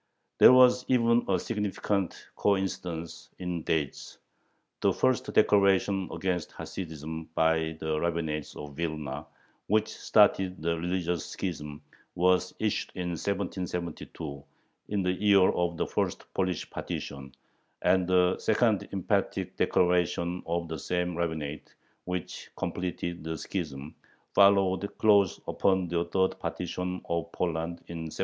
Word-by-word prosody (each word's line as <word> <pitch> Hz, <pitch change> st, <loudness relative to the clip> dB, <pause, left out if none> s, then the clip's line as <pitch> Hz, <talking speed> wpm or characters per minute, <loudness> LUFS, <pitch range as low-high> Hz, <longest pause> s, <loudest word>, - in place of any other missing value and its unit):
There -, -, +10 dB
was 125 Hz, 0 st, +6 dB
even 120 Hz, -2 st, +3 dB
a 95 Hz, -, +3 dB
significant 105 Hz, -3 st, -2 dB
coincidence 90 Hz, -4 st, -2 dB
in 90 Hz, -2 st, -3 dB
dates: 75 Hz, -3 st, -2 dB, 0.6 s
the -, -, +3 dB
first 130 Hz, -3 st, +1 dB
declaration 100 Hz, -2 st, +3 dB
against 90 Hz, 0 st, -2 dB
Hasidism 80 Hz, -2 st, -6 dB
by 80 Hz, 0 st, +2 dB
the 80 Hz, -1 st, -1 dB
rabbinate 80 Hz, -3 st, -2 dB
of 75 Hz, -1 st, -8 dB
Vilna, 75 Hz, -2 st, -4 dB, 0.4 s
which 110 Hz, +1 st, +3 dB
started 95 Hz, -4 st, +3 dB
the 85 Hz, +2 st, 0 dB
religious 90 Hz, 0 st, -2 dB
schism, 75 Hz, -5 st, -5 dB, 0.3 s
was 90 Hz, +1 st, +3 dB
issued 110 Hz, -2 st, -1 dB
in 90 Hz, -1 st, -3 dB
1772, 85 Hz, -5 st, -4 dB, 0.4 s
in 100 Hz, -2 st, -1 dB
the 90 Hz, -, +2 dB
year 100 Hz, -1 st, +5 dB
of 85 Hz, -1 st, -1 dB
the -, -, 0 dB
first -, -, -2 dB
Polish 95 Hz, -3 st, -1 dB
partition, 70 Hz, -1 st, -6 dB, 0.5 s
and 90 Hz, 0 st, +3 dB
the 90 Hz, 0 st, +3 dB
second 110 Hz, -2 st, +2 dB
emphatic 95 Hz, -3 st, -1 dB
declaration 90 Hz, 0 st, +1 dB
of 85 Hz, 0 st, -1 dB
the 80 Hz, -1 st, -5 dB
same 90 Hz, +1 st, -1 dB
rabbinate, 80 Hz, -3 st, -4 dB, 0.3 s
which 90 Hz, -1 st, -5 dB
completed 85 Hz, -2 st, -3 dB
the 80 Hz, 0 st, -3 dB
schism, 75 Hz, -7 st, -5 dB, 0.4 s
followed 100 Hz, -1 st, +4 dB
close 100 Hz, -4 st, +4 dB
upon 95 Hz, -2 st, +1 dB
the 85 Hz, 0 st, 0 dB
third 95 Hz, -1 st, 0 dB
partition 90 Hz, 0 st, -3 dB
of 85 Hz, 0 st, -2 dB
Poland, 85 Hz, 0 st, -2 dB
in 80 Hz, -1 st, -6 dB
1796. -, -, -10 dB
90 Hz, 125 wpm, -29 LUFS, 80-95 Hz, 0.6 s, There